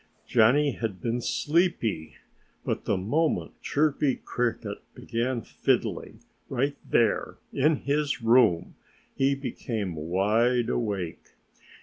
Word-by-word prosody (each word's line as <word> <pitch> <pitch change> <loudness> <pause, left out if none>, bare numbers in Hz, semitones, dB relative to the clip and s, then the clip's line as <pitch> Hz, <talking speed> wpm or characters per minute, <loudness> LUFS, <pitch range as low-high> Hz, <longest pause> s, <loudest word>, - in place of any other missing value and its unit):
Johnnie 130 +6 +4
had 110 -6 -4
been 120 +3 -2
sleepy. 145 - 0 0.5
But - - -2
the - - +1
moment 145 - -1
Chirpy 145 -2 +1
Cricket 120 -1 -3 0.2
began 120 0 -2
fiddling - - -1 0.3
right 140 +3 0
there 115 -3 +1 0.2
in 150 +4 +3
his 145 0 -1
room 115 -7 +3 0.4
he 135 +1 +2
became 115 -7 -4
wide 105 +9 +1
awake. 100 -7 -3
120 Hz, 100 wpm, -27 LUFS, 110-140 Hz, 0.5 s, Johnnie